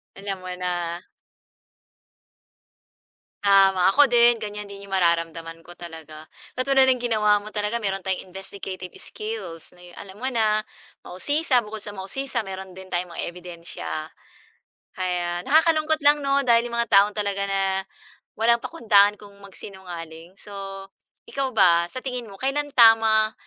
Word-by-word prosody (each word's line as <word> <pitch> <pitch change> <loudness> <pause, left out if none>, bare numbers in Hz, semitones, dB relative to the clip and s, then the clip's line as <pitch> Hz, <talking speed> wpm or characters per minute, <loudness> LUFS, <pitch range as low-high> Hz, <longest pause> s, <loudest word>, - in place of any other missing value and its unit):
Alam 195 -1 -5
mo - - -5
na. 175 -1 -3 2.4
Tama, 195 -2 +5
ako 290 +7 +6
din 240 -1 +5
ganiyan 210 -1 -6
din 200 0 -10
yung 195 - -5
mararamdaman 165 -2 -1
ko 175 - -12
talaga. 160 -2 -11 0.3
Katulad 265 +1 +3
ng 255 -1 +2
ginawa 210 -3 +2
mo 215 - -9
talaga 210 +2 -2
meron 195 -1 -2
tayong 190 -1 -3
investigative 190 -1 -8
skills 200 -7 -7
na 175 - -20
yung, 175 0 -14
alam 195 -1 -11
mo 260 - -1
na, 215 -3 +1 0.4
mausisa 280 - 0
bukod 215 0 -8
sa 205 - -7
mausisa 235 +5 -4
meron 190 -1 -8
din 190 0 -10
tayong 175 0 -2
mga 170 - -5
ebidensiya, 170 -3 -7 0.9
ayan. 175 -1 -2
Nakakalungkot 315 +1 +3
lang 290 +1 +5
'no 275 0 +2
dahil 235 -1 +3
yung 235 - -6
mga 235 - 0
tao 200 0 +6
talaga 200 -1 -1
na 195 0 0 0.8
walang 235 +1 +3
pakundangan 210 -9 +3
kung 200 -1 -15
magsinungaling. 180 -3 -10
So, 195 -1 -8 0.4
ikaw 275 -1 -2
ba, 170 -7 +4
sa 255 - -6
tingin 250 -3 -5
mo, 195 - -11
kailan 290 +2 -2
tama 225 -2 +5
200 Hz, 145 wpm, -24 LUFS, 180-235 Hz, 2.4 s, ako